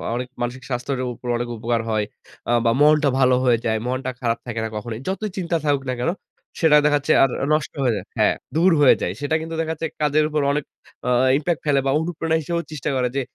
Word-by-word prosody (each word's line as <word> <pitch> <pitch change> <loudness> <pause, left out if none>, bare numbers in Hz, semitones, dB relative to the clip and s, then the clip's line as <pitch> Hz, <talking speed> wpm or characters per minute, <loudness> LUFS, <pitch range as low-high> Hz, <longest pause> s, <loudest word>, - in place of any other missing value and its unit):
অনেক 125 +1 -3
মানসিক 125 +2 -3
স্বাস্থ্যের 125 +1 -2
উপর 125 - -11
অনেক 120 0 -3
উপকার 115 +1 -1
হয়। 110 -1 0 0.4
আ - - +2
বা 115 - +4
মনটা 150 0 +5
ভালো 130 -1 +5
হয়ে 120 -2 +4
যায়, 110 -1 +1
মনটা 130 +1 -2
খারাপ 115 -1 0
থাকে 115 -2 -3
না - - -3
কখনোই। 110 +1 -5
যতই 195 +3 -2
চিন্তা 175 -2 -1
থাকুক 140 -2 +1
না - - 0
কেন 145 - +1 0.5
সেটা 160 -4 +6
দেখা 145 0 +4
যাচ্ছে 145 - +1
আর 135 - +4 0.2
নষ্ট 155 -1 -1
হয়ে 125 -3 +2
যায় 100 - -5
হ্যাঁ। - - +4 0.2
দূর 175 +4 +4
হয়ে 140 - +7
যায়। - - -1
সেটা 145 +2 0
কিন্তু 165 +1 -5
দেখা 160 0 -2
যাচ্ছে 160 +1 -3
কাজের 150 +1 +3
উপর 150 -1 0
অনেক 145 +1 -1 0.4
আ - - +2 0.3
ইমপ্যাক্ট 155 +2 -1
ফেলে 145 -2 +3
বা 135 - +2
অনুপ্রেরণা 160 0 -1
হিসেবেও 170 +2 -2
চেষ্টা 150 -1 -3
করে। 125 -1 +1
যে 140 - +1
140 Hz, 225 wpm, -22 LUFS, 125-155 Hz, 0.5 s, হয়ে